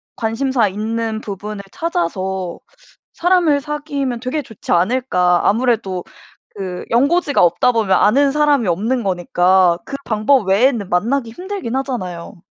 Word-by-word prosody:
관심사 230 Hz, +1 st, 0 dB
있는 220 Hz, +2 st, -3 dB
부분을 205 Hz, 0 st, -6 dB
찾아서 190 Hz, -, -3 dB, 0.6 s
사람을 340 Hz, -5 st, +2 dB
사귀면 285 Hz, -4 st, -3 dB
되게 255 Hz, +5 st, -2 dB
좋지 225 Hz, -5 st, -10 dB
않을까. 180 Hz, -2 st, +2 dB
아무래도 215 Hz, -5 st, 0 dB, 0.5 s
그 185 Hz, -3 st, -5 dB
연고지가 285 Hz, +5 st, +2 dB
없다 175 Hz, +8 st, +3 dB
보면 210 Hz, -5 st, +2 dB
아는 275 Hz, +9 st, +3 dB
사람이 295 Hz, -5 st, +2 dB
없는 220 Hz, +8 st, 0 dB
거니까 180 Hz, -1 st, +2 dB
그 -, -, -8 dB
방법 215 Hz, 0 st, +2 dB
외에는 220 Hz, 0 st, +2 dB
만나기 230 Hz, +7 st, 0 dB
힘들기는 360 Hz, -, -5 dB
하잖아요. 185 Hz, -11 st, -5 dB
225 Hz, 305 characters per minute, -18 LUFS, 190-275 Hz, 0.6 s, 없다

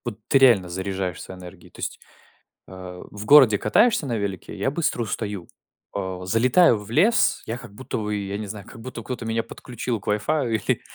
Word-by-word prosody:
Вот 115 Hz, -3 st, -5 dB
ты -, -, +4 dB
реально 115 Hz, -9 st, +5 dB
заряжаешься 95 Hz, 0 st, -4 dB
энергией. 90 Hz, -1 st, -12 dB
То -, -, -17 dB
есть, -, -, -4 dB, 0.7 s
а, 90 Hz, -1 st, -9 dB
в 105 Hz, 0 st, -8 dB
городе 125 Hz, -4 st, +7 dB
катаешься 155 Hz, -, +3 dB
на 120 Hz, -3 st, -1 dB
велике 100 Hz, -3 st, -4 dB
и -, -, -10 dB
я 130 Hz, -, 0 dB
быстро 145 Hz, -5 st, -1 dB
устаю. 105 Hz, -4 st, -4 dB, 0.5 s
А, 95 Hz, -2 st, -4 dB
залетаю 120 Hz, -, +4 dB
в 105 Hz, 0 st, -11 dB
лес, 195 Hz, -, +3 dB
я 115 Hz, -, -3 dB
как 120 Hz, -4 st, -11 dB
будто 130 Hz, +5 st, -5 dB
бы, 105 Hz, -1 st, -2 dB
я 100 Hz, -1 st, -3 dB
не 105 Hz, -, -5 dB
знаю, 100 Hz, 0 st, -8 dB
как 115 Hz, -, -12 dB
будто 120 Hz, -1 st, -7 dB
кто-то 125 Hz, +1 st, -5 dB
меня 115 Hz, 0 st, 0 dB
подключил 120 Hz, -2 st, -5 dB
к -, -, -20 dB
вай-фаю 115 Hz, +4 st, 0 dB
или, 110 Hz, -, 0 dB
110 Hz, 195 wpm, -24 LUFS, 100-125 Hz, 0.7 s, городе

